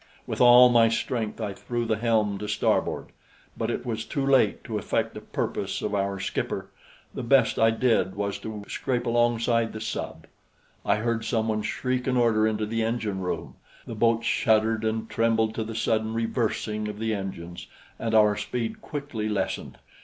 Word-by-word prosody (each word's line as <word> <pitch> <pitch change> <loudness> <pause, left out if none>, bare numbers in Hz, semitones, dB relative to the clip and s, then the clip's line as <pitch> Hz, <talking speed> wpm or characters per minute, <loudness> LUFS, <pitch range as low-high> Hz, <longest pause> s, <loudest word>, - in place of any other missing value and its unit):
With - - -3
all 125 0 +9
my 115 -2 +5
strength 115 -1 -2
I 105 -3 -3
threw 120 +3 -3
the 110 -1 0
helm 110 -3 +1
to 105 - -5
starboard; - - 0 0.5
but 115 - -2
it 120 - -3
was 110 -2 -2
too 140 +3 -2
late 135 -1 +3
to - - -3
effect - - -1
the - - -8
purpose - - -3
of 105 - -2
our 100 -1 -1
skipper. 100 - -3 0.4
The - - -4
best - - +3
I 115 - +5
did 115 -4 +1
was 100 0 -2
to 110 -2 -6
scrape 125 -2 -2
alongside 115 -1 +2
the 110 - -5
sub. 110 - -5 0.6
I - - +2
heard 115 +1 -1
someone 110 -2 0
shriek 125 +3 -2
an 130 -1 +2
order 110 -3 +3
into 110 -1 -1
the 115 +2 -2
engine 110 -3 -1
room; 90 - -4 0.3
the - - -6
boat 115 +1 +2
shuddered 110 -1 +2
and 110 0 -1
trembled 115 -1 +1
to 110 - -2
the 110 0 -6
sudden 110 0 0
reversing 110 -2 -1
of 105 -1 -6
the 110 0 -1
engines, 90 -4 -6 0.3
and 110 -1 -1
our 105 -1 +5
speed 115 +1 -4
quickly 140 -8 -4
lessened. 100 -3 -3
110 Hz, 175 wpm, -26 LUFS, 105-115 Hz, 0.6 s, all